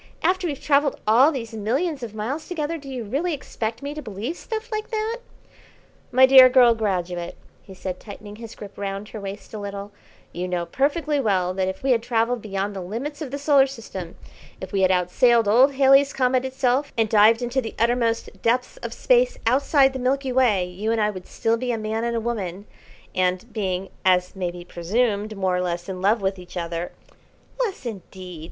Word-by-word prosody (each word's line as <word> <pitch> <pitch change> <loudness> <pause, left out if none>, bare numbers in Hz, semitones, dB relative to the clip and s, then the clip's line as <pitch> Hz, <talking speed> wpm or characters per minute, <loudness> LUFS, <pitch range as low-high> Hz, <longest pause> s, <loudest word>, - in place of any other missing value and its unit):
After 370 -1 +2
we've 285 -4 -4
travelled 285 -1 +2
all 245 +8 +6
these 230 -6 -5
millions 265 - -1
of 225 -3 -7
miles 260 +9 -4
together 330 -2 -3
do 275 -1 -11
you 255 -3 -4
really 295 - -1
expect 230 -3 -5
me 285 +1 -4
to 305 - -6
believe 225 - -5
stuff 445 +4 -6
like 430 0 -3
that?" 445 +1 -2 0.9
"My 260 +1 +7
dear 260 -1 +9
girl 245 -2 +6
graduate," 180 -5 -2 0.3
he 190 - -13
said, 185 0 -5
tightening 205 0 -10
his 230 -1 -9
grip 200 -1 -11
round 200 +1 -4
her 215 - -7
waist 200 +2 -8
a 215 - -5
little, 200 0 -6 0.4
"you 180 +1 -3
know 175 -1 -2
perfectly 290 - 0
well 185 -7 +1
that 190 0 -1
if 190 +5 -5
we 270 - +2
had 235 -2 +3
travelled 235 0 0
beyond 200 -1 -3
the 190 - -4
limits 245 - -5
of 295 - -4
the 280 - -4
Solar 280 -1 +4
System, 195 -9 -8 0.4
if 190 0 -7
we 195 - 0
had 185 - +4
outsailed 210 +6 +3
old 255 +6 +5
Halley's 275 +1 +5
Comet 255 0 +1
itself, 265 +1 0
and 225 -1 +3
dived 220 +2 +5
into 245 +2 0
the 225 - -7
uttermost 230 0 0
depths 250 - 0
of - - -6
Space - - +3
outside 270 +2 +4
the 265 - -4
Milky 265 +1 0
Way, 240 -8 +3
you 190 +5 -3
and 230 - +1
I 210 0 +2
would 185 -3 -9
still 225 +1 0
be 250 +1 -2
a 230 - -1
man 220 +1 -2
and 235 0 -1
a - - +1
woman, 205 -5 -4 0.5
and, 185 +4 -1
being, 190 -3 -2
as 180 0 +2
may 185 -2 -2
be 175 0 -9
presumed, 210 +4 -1
more 190 -2 +1
or 180 - 0
less 175 -1 -3
in 185 -2 -5
love 205 +2 +2
with 190 0 -1
each 180 0 -10
other 170 0 -3 0.3
" - - -32
"Less 390 - -4
indeed!" 185 -5 -8
225 Hz, 205 wpm, -23 LUFS, 195-265 Hz, 0.9 s, dear